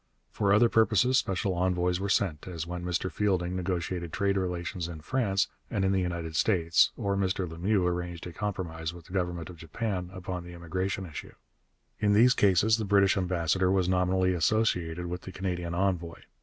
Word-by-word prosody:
For 100 -1 +1
other 105 +4 +6
purposes 115 +3 +3
special 95 -2 -1
envoys 90 0 +1
were 100 +1 -2
sent, 95 -6 0
as 85 -3 -4
when 90 0 -5
Mr 90 +1 -2
Fielding 90 -3 0
negotiated 90 -2 -3
trade 100 +2 0
relations 90 -1 -2
in 80 -3 -8
France 100 -2 +1 0.2
and 95 - 0
in 95 - +2
the 95 -1 +2
United 85 -3 -3
States, 85 -2 +3
or 100 -1 -1
Mr 95 -1 0
Lemieux 90 +4 0
arranged 85 -1 -3
a 90 - -7
compromise 85 -5 -4
with 85 -2 -12
the 90 - -13
government 90 -3 -2
of 85 - -13
Japan 90 +3 -4
upon 90 -1 -5
the 90 0 -10
immigration 95 +3 -3
issue. 75 -5 -9 0.6
In 105 -1 +3
these 120 +4 +6
cases 105 +2 +4
the 110 - -2
British 100 -1 +4
ambassador 90 -1 +1
was 95 -2 +2
nominally 95 0 +2
associated 90 -2 +1
with 90 +1 -4
the 95 - -9
Canadian 90 -2 -3
envoy. 90 -3 -1
90 Hz, 180 wpm, -28 LUFS, 85-100 Hz, 0.6 s, other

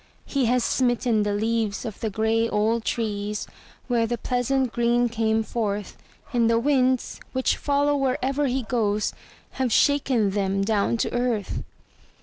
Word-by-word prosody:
He 275 -3 0
has 245 +1 +2
smitten 245 -3 +1
the 205 0 0
leaves 220 -1 -1
of 220 -3 -6
the 220 - -2
gray 220 +2 +1
old 220 +2 +1
trees 210 -3 -2 0.4
where 235 -2 +1
their 240 +1 -2
pleasant 250 +1 0
green 240 0 +2
came 220 -1 +1
forth, 210 -3 -3 0.4
And 235 -2 +3
the 230 - +3
winds, 255 0 +1
which 260 0 +1
follow 285 0 +1
wherever 275 +1 0
he 260 0 -1
goes, 215 -3 0 0.5
have 255 -3 +1
shaken 260 -7 +3
them 195 0 0
down 210 +2 +1
to - - -5
earth. 240 -4 -1
230 Hz, 145 wpm, -24 LUFS, 215-255 Hz, 0.5 s, And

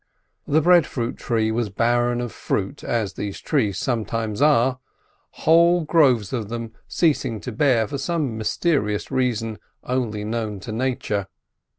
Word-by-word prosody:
The 155 +3 +3
breadfruit 155 -9 +3
tree 110 -2 0
was 115 -1 -1
barren 120 +3 +1
of 120 -2 -4
fruit, 100 +8 -3
as 110 -5 -1
these 100 0 -5
trees 110 - 0
sometimes 115 -2 -2
are, 130 -3 +4 0.7
whole 170 +1 +5
groves 130 - +3
of 110 -5 -3
them 115 -1 -5
ceasing 135 -9 +1
to 125 - -5
bear 115 -2 +2
for 140 - -4
some 150 -6 -1
mysterious 110 -1 0
reason 115 -4 -1 0.2
only 120 -5 -2
known 110 -2 -3
to 110 - -7
Nature. 115 -4 -2
120 Hz, 135 wpm, -23 LUFS, 110-135 Hz, 0.7 s, whole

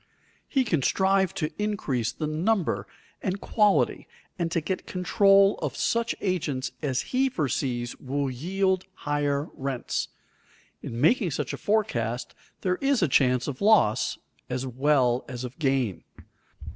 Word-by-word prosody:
He 270 -2 +2
can 165 - 0
strive 190 +4 +2
to 155 - -2
increase 140 - -1
the 155 - -4
number 155 - 0 0.3
and 190 +1 -2
quality 210 -1 +2 0.3
and 170 -1 -1
to 165 - +1
get 185 +4 -4
control 195 +2 +4
of - - -3
such 235 0 0
agents 150 -9 -1
as 135 -4 -2
he 265 +1 +3
foresees 130 - -2
will 140 +1 -2
yield 190 +7 0 0.2
higher 145 0 0
rents. 135 -2 -3 0.7
In 115 - -5
making 185 - +3
such 145 - -3
a - - -1
forecast 125 - -1 0.3
there 180 -1 0
is 275 -6 +2
chance 125 -2 +3
of 140 -3 -5
loss 200 - +3 0.3
as 125 +1 -2
well 130 -1 +2
as 125 -1 -5
of 125 +6 -8
gain. 135 - 0
150 Hz, 135 wpm, -26 LUFS, 130-195 Hz, 0.7 s, control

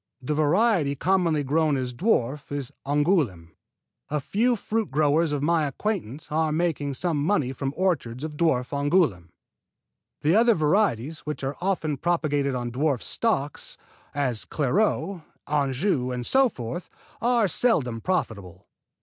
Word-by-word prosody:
The 135 +3 -2
variety 155 0 +2
commonly 165 -1 +1
grown 150 +1 +1
as 125 -1 -3
dwarf 140 - 0
is 140 -2 -4 0.2
Angouleme. 145 - +1 0.6
A 150 - 0
few 230 - +1
fruit 220 0 -2
growers 150 +3 +2
of 145 -1 -1
my 160 -1 +2
acquaintance 155 - -4
are 160 0 +1
making 150 -4 -1
some 155 -1 -1
money 150 -7 +1
from 135 +1 -3
orchards 150 -9 -1
of 155 -1 -5
dwarf 145 -6 +1
Angouleme. 140 - +1 0.9
The 155 +3 +3
other 230 +1 +5
varieties 155 - +1
which 150 -2 -6
are 135 +1 -2
often 175 -6 -1
propagated 145 -4 0
on 120 -1 -3
dwarf 135 0 0
stock 150 -12 -1 0.6
as 130 -6 +1
Clairgeau, 170 +3 0 0.2
Anjou 140 -1 0
and 125 -1 -4
so 265 - +4
forth, 125 - -6 0.3
are 235 -3 +3
seldom 145 - +1
profitable. 110 - -3
150 Hz, 135 wpm, -25 LUFS, 135-175 Hz, 0.9 s, other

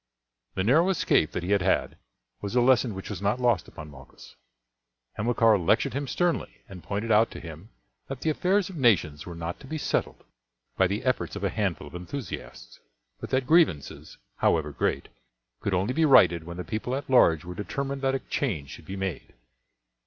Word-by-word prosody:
The 95 - 0
narrow 155 - +4
escape 125 - +2
that 90 - -3
he 90 - -3
had 100 -2 +3
had 95 - +1 0.5
was 100 +4 -4
a - - +5
lesson 120 -3 +3
which 95 - -7
was - - -6
not 100 +5 0
lost 120 -8 +1
upon 75 -2 -10
Malchus. 65 -1 -15 0.8
Hamilcar 115 -1 +3
lectured 85 +5 +2
him 140 +1 -3
sternly, 175 +5 -1
and 95 -2 -10
pointed 105 +7 -3
out 110 +2 +5
to - - -9
him 85 +5 -10 0.4
that 135 -1 -6
the 160 - +1
affairs 185 +5 +1
of 190 - -9
nations 85 - +2
were 85 - -7
not 85 +1 -5
to 135 - -13
be 155 - -4
settled - - -2 0.5
by 95 - +3
the 100 +3 -3
efforts 130 -4 -1
of 100 - -6
a 100 - +1
handful 100 -6 -2
of - - -14
enthusiasts, 90 - -8 0.4
but - - -7
that 130 0 +1
grievances, 155 - +1 0.2
however 75 -2 +1
great, 70 - -1 0.5
could 100 - -1
only 95 +7 0
be 160 - +1
righted 85 - +5
when 85 +1 -8
the 90 - -4
people 110 +6 -3
at 140 - -5
large 85 -11 +4
were 90 - -6
determined 135 +8 -4
that 135 0 +1
a - - -1
change 85 - -3
should - - -11
be 95 - -6
made. 95 -10 -5
105 Hz, 195 wpm, -26 LUFS, 85-130 Hz, 0.8 s, a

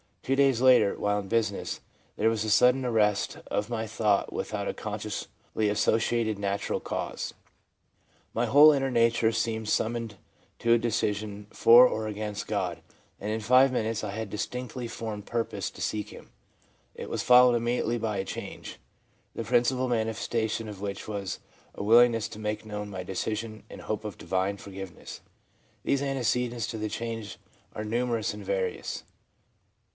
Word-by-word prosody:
Two 135 - +1
days 135 -3 +3
later, 125 -6 +5
while 105 0 +1
in 100 - -7
business, 110 -2 -1 0.4
there 110 - +2
was 110 -1 -1
a 110 - -2
sudden 125 +4 +4
arrest 105 -4 +1
of 105 +2 -2
my 115 -2 -2
thought 105 -2 +1
without - - -3
a - - -1
consciously 110 - -4
associated 110 +1 +1
natural 100 0 -1
cause. - - -4 1.0
My 120 - +1
whole 145 +5 +8
inner 135 -2 +1
nature 115 -2 +3
seemed 110 -1 -2
summoned 115 -1 -1 0.4
to 115 0 +3
a - - +6
decision 105 -3 -2
for 120 +2 +8
or 110 -2 -3
against 105 -1 -4
God; - - -2 0.4
and 105 - -4
in 110 +1 -2
five 130 +4 +5
minutes 110 -3 -1
I 105 - -3
had 110 +2 -4
a - - -17
distinctly 125 +3 -4
formed 110 -3 -6
purpose 115 -1 -2
to - - -12
seek 105 -1 -2
Him. - - -13 0.6
It - - -7
was - - -2
followed 125 0 +7
immediately 120 0 0
by 110 -2 -2
a 95 - -2
change, - - -7 0.6
the 115 - -3
principal 125 +3 +2
mani 115 -2 0
festation 110 0 -2
of 100 -2 -9
which 100 -1 -5
was 100 -3 -4 0.4
a - - -5
willingness 115 0 +5
to 105 - -9
make 105 0 -3
known 105 -1 -5
my 95 -2 -5
decision 110 +4 -4
and - - -10
hope 110 0 -4
of 105 -4 -6
divine 95 +3 -1
forgiveness.' 95 -2 -9 0.6
These 140 - +1
antecedents 125 -3 0
to 110 - -5
the 105 0 -2
change 115 -1 -5 0.4
are 105 - -4
numerous 115 -1 -1
and 105 0 -8
various. 95 -2 -2
110 Hz, 160 wpm, -28 LUFS, 105-120 Hz, 1.0 s, whole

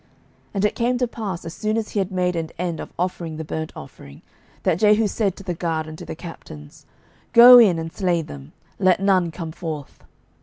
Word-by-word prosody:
12:010:025 - - -34 0.5
And 200 +1 +1
it 210 - 0
came 245 +1 0
to 250 0 0
pass, 200 -7 -6
as 165 - -6
soon 215 +2 -2
as 220 -2 -3
he 205 - -2
had 195 0 -2
made 180 -1 0
an 165 -1 -3
end 170 -2 -3
of - - -7
offering 170 -3 -3
the 160 - -4
burnt 160 +1 -4
offering, 70 0 -12 0.4
that 165 - +1
Jehu 210 +1 +4
said 200 -2 -1
to - - -11
the 180 - -3
guard 160 -2 -2
and 155 0 -9
to - - -8
the - - -7
captains, 75 - -11 0.5
Go 245 +1 +10
in, 200 -8 +5
and 165 0 -5
slay 175 -4 0
them; 70 - -11 0.3
let 185 -1 +3
none 190 -3 +2
come 165 0 -7
forth. 155 -4 -7
180 Hz, 220 wpm, -22 LUFS, 160-205 Hz, 0.5 s, Go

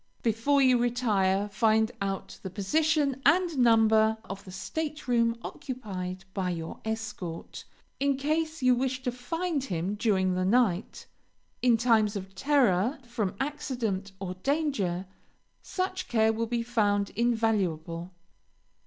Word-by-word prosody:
Before 240 +5 +2
you 255 -2 +5
retire, 210 -5 +1
find 220 +2 +2
out 195 -1 -4
the 190 - -5
position 280 - +1
and 335 +4 +3
number 220 -2 +5
of 195 -1 -8
the 185 - -9
stateroom 245 -1 -1
occupied 190 -8 -6
by 190 -2 -1
your 165 -2 -5
escort, 220 -6 -5 0.3
in 280 -1 +2
case 310 +1 -1
you 255 0 +6
wish 260 +1 -1
to 250 - 0
find 290 +4 -2
him 180 -2 -2
during 195 -4 +1
the 185 0 0
night. 205 -2 +1 0.6
In 245 -2 +4
times 220 -3 +3
of 195 -1 -6
terror, 240 - +2
from 230 -6 -3
accident 245 -9 -2
or 190 -2 -4
danger, 200 - -1 0.6
such 370 0 -3
care 220 -1 +3
will 230 +1 -2
be 235 0 -1
found 205 -4 +1
invaluable. 195 -8 0
225 Hz, 125 wpm, -28 LUFS, 195-260 Hz, 0.6 s, you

